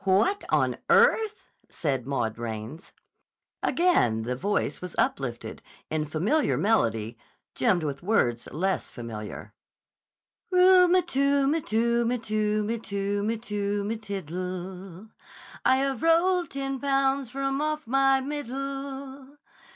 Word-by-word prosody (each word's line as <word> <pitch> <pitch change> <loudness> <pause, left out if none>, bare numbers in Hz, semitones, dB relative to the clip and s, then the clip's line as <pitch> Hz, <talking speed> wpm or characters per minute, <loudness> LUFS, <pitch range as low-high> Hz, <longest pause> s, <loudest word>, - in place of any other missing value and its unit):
"What 205 - +2
on - - +1
earth!" 445 -2 +3 0.2
said 135 -5 -2
Maud 120 -5 -2
Raines. 115 - -6 0.7
Again 120 - +2
the 125 +2 -2
voice 200 +11 -1
was 180 -1 -7
uplifted, 125 -4 -2 0.3
in 155 -1 -1
familiar 195 - +1
melody, 115 - +1 0.3
gemmed 185 -8 +2
with 140 -2 -3
words 130 - +1
less 190 +7 -1
familiar: 110 -3 -8 1.0
"Ru 365 0 +6
m 360 +1 +3
tu 280 -3 +2
m 300 +4 +1
tu 235 0 +1
m 250 0 0
tu 215 -1 0
m 230 0 -2
tu 200 0 -2
m 225 -1 -2
tu 205 -2 -2
m 225 +1 -3
tiddle, 185 0 -6 0.5
I 260 - +5
have 270 -2 -1
rolled 345 +2 +3
ten 270 -1 -4
pounds 275 -1 +1
from 275 +2 -2
off 305 0 -2
my 270 +2 +3
middle. 275 0 -6
225 Hz, 125 wpm, -27 LUFS, 175-275 Hz, 1.0 s, Ru